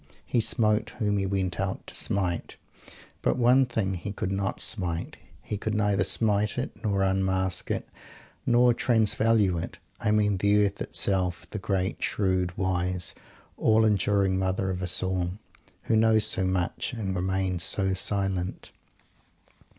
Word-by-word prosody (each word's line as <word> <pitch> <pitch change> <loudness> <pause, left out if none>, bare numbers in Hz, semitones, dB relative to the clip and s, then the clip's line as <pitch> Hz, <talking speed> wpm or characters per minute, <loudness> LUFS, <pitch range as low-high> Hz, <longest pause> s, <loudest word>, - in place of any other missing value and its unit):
He 120 - +1
smote 110 -1 +2
whom 105 -3 0
he 95 - -1
went 95 -3 -2
out 95 -1 -3
to - - -10
smite. 90 -3 -2 0.7
But - - +1
one 125 +2 +4
thing 100 -6 -1
he 90 +3 -5
could 100 -1 -3
not 95 0 -2
smite; 85 -5 -1 0.3
he 105 - -4
could 110 +1 -3
neither 105 -2 +2
smite 105 -1 +1
it, - - -2
or 100 -3 +1
unmask 95 -1 0
it, - - -2 0.6
or 120 0 +5
"transvalue" 110 -5 +2
it. - - -8 0.2
I - - -1
mean 105 -2 +2
the 105 +2 +3
Earth 100 0 -4
itself 90 -3 0
the 105 - -4
great, 95 -1 -2
shrewd, 95 -3 0
wise, 90 -2 -1 0.4
all 110 0 +3
enduring 100 -2 +2
Mother 95 0 -1
of 90 0 -4
us 90 0 0
all 90 -1 -1 0.5
who 115 - +1
knows 110 0 +4
so 95 - +3
much, 95 +3 -1
and 100 -5 -3
remains 95 -1 -1
so 95 +3 +2
silent! 95 -1 -2
95 Hz, 150 wpm, -27 LUFS, 95-105 Hz, 0.7 s, or